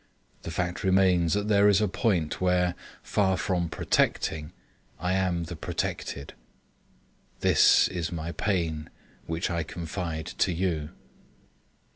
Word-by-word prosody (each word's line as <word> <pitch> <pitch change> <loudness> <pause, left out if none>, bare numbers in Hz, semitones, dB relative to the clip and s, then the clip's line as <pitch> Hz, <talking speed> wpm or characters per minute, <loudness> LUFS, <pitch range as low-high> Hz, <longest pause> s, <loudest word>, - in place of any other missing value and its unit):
The - - -6
fact 90 +1 -2
remains 95 -3 +3
that 105 0 -1
there 105 -1 +5
is 100 -1 +4
a 105 - +2
point 95 -6 0
where, 90 -1 +2 0.3
far 95 -2 +1
from 90 -4 -1
protecting, 80 -1 0 0.5
I 90 +3 0
am 90 -3 0
the 85 +2 -6
protected. 70 -2 -4 1.1
This - - +5
is 85 -2 -3
my 85 -1 -4
pain 80 -3 -1 0.4
which 80 +2 -2
I 85 -1 0
confide 80 0 -4
to 95 - 0
you. 85 -4 -1
90 Hz, 125 wpm, -27 LUFS, 80-95 Hz, 1.1 s, there